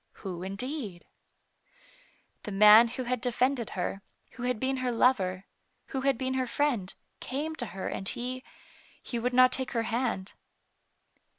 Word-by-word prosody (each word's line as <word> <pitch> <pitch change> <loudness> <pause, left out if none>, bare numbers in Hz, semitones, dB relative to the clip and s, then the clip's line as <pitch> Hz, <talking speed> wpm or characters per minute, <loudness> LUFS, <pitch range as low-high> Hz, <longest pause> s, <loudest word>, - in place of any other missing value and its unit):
Who, 180 -3 -4
indeed? 200 - -5 1.4
The 210 - -6
man 210 +3 +8
who 250 +2 -5
had 250 -1 -2
defended 250 -1 0
her, 195 - -2 0.3
who 245 - -11
had 250 -2 -1
been 265 +2 0
her 255 -1 -1
lover, 200 -6 +2 0.4
who 265 - -2
had 270 -2 +2
been 260 +1 -2
her 260 -1 0
friend, 240 -9 0 0.3
came 300 +5 -3
to 240 - -3
her 195 -2 -5
and 190 - -3
he 255 +1 -4 0.3
— - - -27
he 240 - -3
would 245 +2 0
not 255 0 +6
take 260 0 -2
her 230 -2 +1
hand. 225 -4 -2
245 Hz, 160 wpm, -29 LUFS, 210-260 Hz, 1.4 s, man